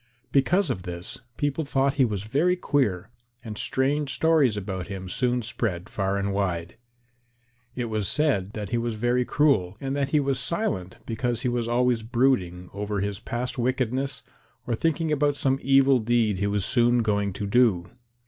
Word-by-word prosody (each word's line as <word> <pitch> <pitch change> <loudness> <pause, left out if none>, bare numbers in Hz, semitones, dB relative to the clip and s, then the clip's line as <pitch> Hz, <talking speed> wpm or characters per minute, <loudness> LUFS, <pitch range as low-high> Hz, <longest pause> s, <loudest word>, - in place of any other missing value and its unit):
Because 170 +4 +3
of 90 - -3
this, 90 -1 -6 0.2
people 145 +2 -1
thought 140 -1 +1
he 135 - +5
was 105 -4 -3
very 145 +12 +2
queer, 115 - 0 0.3
and 110 -2 -6
strange 135 +5 0
stories 145 -5 +3
about 95 -2 -4
him 95 -2 -6
soon 125 +5 0
spread 105 -5 -3
far 95 0 -1
and 100 0 -1
wide. 90 -3 -2 1.0
It 125 - -2
was 110 -4 -1
said 110 - +1
that 105 -3 -5
he 120 - 0
was 115 -1 -2
very 120 +3 +1
cruel, 110 -12 +2
and 135 0 -3
that 140 -1 0
he 150 - +3
was 135 -2 0
silent 95 - -2
because 120 +2 -2
he 125 - +1
was 120 -1 -1
always 120 0 +2
brooding 110 -7 0
over 105 +1 -3
his 100 0 -3
past 120 +2 -4
wickedness 130 +2 -1 0.4
or 120 - -1
thinking 160 +5 0
about 145 -1 +2
some 135 -1 0
evil 135 -1 +4
deed 110 -3 +1
he 100 - +1
was 100 -2 0
soon 120 -1 +3
going 100 -2 0
to 105 - -4
do. 100 -5 +2
120 Hz, 175 wpm, -25 LUFS, 100-135 Hz, 1.0 s, he